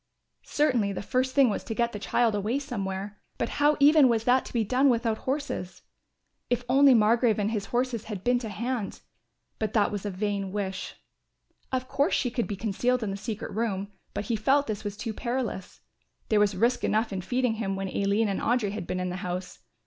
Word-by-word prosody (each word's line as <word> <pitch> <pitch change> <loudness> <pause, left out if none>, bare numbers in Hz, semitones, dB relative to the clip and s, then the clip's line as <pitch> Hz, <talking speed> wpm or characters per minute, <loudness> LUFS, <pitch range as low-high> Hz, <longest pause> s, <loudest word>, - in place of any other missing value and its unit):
Certainly 245 -9 +1
the 195 - -5
first 255 +3 0
thing 275 -2 +6
was - - -3
to 225 - -5
get 235 0 +1
the 210 - -6
child 230 +2 +1
away 210 +5 0
somewhere, 205 -7 -4 0.2
but 230 - -1
how 295 +1 +4
even 290 -1 +7
was 225 -2 +1
that 250 +2 +3
to - - -9
be 235 -2 +1
done 255 +6 +3
without 230 -2 +1
horses? 275 -10 -3 0.7
If 245 0 0
only 270 0 +6
Margrove 225 +1 +4
and 210 +1 0
his 210 -3 -2
horses 240 -1 -1
had 200 -4 -6
been 245 0 +3
to 230 -3 -5
hand! 235 0 -3 0.6
But 215 -1 -2
that 210 -3 +3
was 205 -2 -4
a 205 - -2
vain 200 0 -2
wish. 195 -2 -4 0.8
Of 255 0 -1
course 285 +7 +1
she 245 - 0
could 235 -1 -1
be 205 - -3
concealed 230 +4 0
in 205 - -2
the - - -3
secret 210 +1 -5
room, 205 -3 -2 0.2
but 205 - -2
he 230 - 0
felt 270 +7 +3
this 215 -3 -4
was 205 -1 -5
too 220 +1 -4
perilous. 235 -5 -4 0.5
There 215 - +4
was 205 -1 +3
risk 240 +5 +2
enough 220 0 +1
in 190 - -2
feeding 245 +4 0
him 195 -2 -1
when 195 0 -3
Aline 200 +3 +1
and 195 - -2
Audry 230 -4 +1
had 205 -4 -5
been 185 - -2
in 180 0 -2
the 180 - -4
house. 180 0 -5
220 Hz, 210 wpm, -27 LUFS, 200-250 Hz, 0.8 s, even